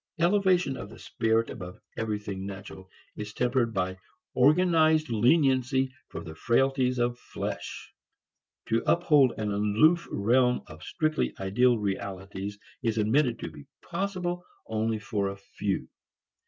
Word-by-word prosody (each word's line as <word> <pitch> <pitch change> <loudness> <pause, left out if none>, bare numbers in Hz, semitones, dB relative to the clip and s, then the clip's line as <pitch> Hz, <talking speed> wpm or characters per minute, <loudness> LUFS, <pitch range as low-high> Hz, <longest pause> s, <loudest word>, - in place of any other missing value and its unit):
Elevation 180 -5 +3
of - - -7
the - - -12
spirit 115 0 0
above 90 -4 -8 0.2
everything 105 -3 -3
natural 95 -1 -8 0.3
is 105 0 -7
tempered 125 -1 +1
by 95 -2 -2 0.3
organized 155 +1 +4
leniency 130 +1 +3 0.2
for - - -7
the 80 - -8
frailties 125 - +1
of 120 0 0
flesh. - - -6 0.8
To 115 +1 +2
uphold 150 -7 +4
an 105 -1 -2
aloof 105 +12 +3
realm 125 +4 +2
of 80 +2 -12
strictly 155 - -1
ideal 120 +6 +3
realities 100 0 -4 0.2
is 115 -1 0
admitted 120 +3 +2
to 85 - -5
be 75 -2 -13 0.2
possible 180 -1 -3 0.2
only 110 0 -1
for 105 -2 -2
a 100 - -7
few. 100 0 -3
115 Hz, 125 wpm, -28 LUFS, 100-140 Hz, 0.8 s, organized